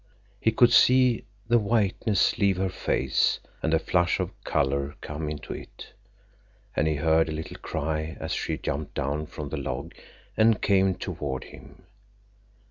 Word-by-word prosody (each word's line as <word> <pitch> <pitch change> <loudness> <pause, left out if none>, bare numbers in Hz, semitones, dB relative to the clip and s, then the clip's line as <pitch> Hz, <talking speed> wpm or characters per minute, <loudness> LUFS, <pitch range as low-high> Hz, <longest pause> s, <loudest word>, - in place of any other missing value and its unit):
_ - - -34 0.4
He 110 - +2
could 120 +1 +5
see 125 -1 +5 0.2
the 120 0 +4
whiteness 105 -2 +1
leave 100 -3 +3
her 95 0 0
face 65 -7 +1 0.2
and 80 - 0
a 80 - +5
flush 85 +1 +1
of - - -2
color 70 +1 0
come 75 +1 -5
into 75 -1 -6
it, - - -11 0.8
and 75 - +2
he 80 - +1
heard 80 +2 +2
a - - -2
little 80 +1 -6
cry 80 +1 -3
as - - -4
she - - -2
jumped 70 +1 -4
down 70 +3 -2
from 75 -2 -7
the 80 - -4
log 65 -3 -4 0.4
and 110 0 +4
came 95 -2 +3
toward 65 -6 -4
him. - - -14
80 Hz, 160 wpm, -26 LUFS, 75-100 Hz, 0.8 s, could